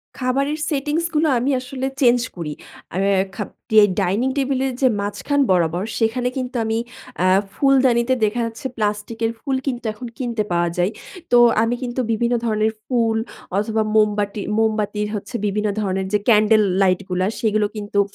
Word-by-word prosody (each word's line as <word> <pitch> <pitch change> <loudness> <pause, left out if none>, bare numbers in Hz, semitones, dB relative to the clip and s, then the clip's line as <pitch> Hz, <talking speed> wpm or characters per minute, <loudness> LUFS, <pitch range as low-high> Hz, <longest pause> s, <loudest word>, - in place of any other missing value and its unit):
খাবারের 275 +4 0
সেটিংস 300 +3 -1
গুলো 310 +1 +3
আমি 270 +4 0
আসলে 260 +1 -4
চেঞ্জ 245 -1 +5
করি। 155 -4 -4 0.4
আর 190 - -1 0.3
খাব 210 - -4 0.2
ডিআই 215 -1 +7
ডাইনিং 205 +8 +1
টেবিল 270 -1 0
এর 260 - -3
যে 260 - +5
মাঝখান 280 +8 -1
বরাবর 175 +1 +1 0.2
সেখানে 245 +2 +1
কিন্তু 255 0 -4
আমি 225 0 0 0.5
আ - - +4 0.3
ফুলদানিতে 260 -3 +3
দেখা 230 +3 -1
যাচ্ছে 230 +3 -5
প্লাস্টিকের 215 +2 -1
ফুল 270 0 -2
কিন্তু 245 -2 -3
এখন 245 +3 -8
কিনতে 235 -4 -1
পাওয়া 170 0 +1
যায়। 180 +4 +1 0.4
তো 245 - +6 0.3
আমি 235 +2 0
কিন্তু 245 +1 -3
বিভিন্ন 235 +2 +1
ধরনের 215 0 +1
ফুল 230 -3 +1 0.4
অথবা 220 +1 0
মোমবাটি 210 -1 +1 0.2
মোমবাতির 215 -1 0
হচ্ছে 210 +4 -6
বিভিন্ন 210 +1 0
ধরণের 190 -1 -1
যে 210 - +4
ক্যান্ডেল 215 0 +5 0.2
লাইট 185 -2 +3
গুলা। 185 +1 0
সেগুলো 215 -2 +1
কিন্তু 205 -1 -2
225 Hz, 160 wpm, -21 LUFS, 210-255 Hz, 0.5 s, ডিআই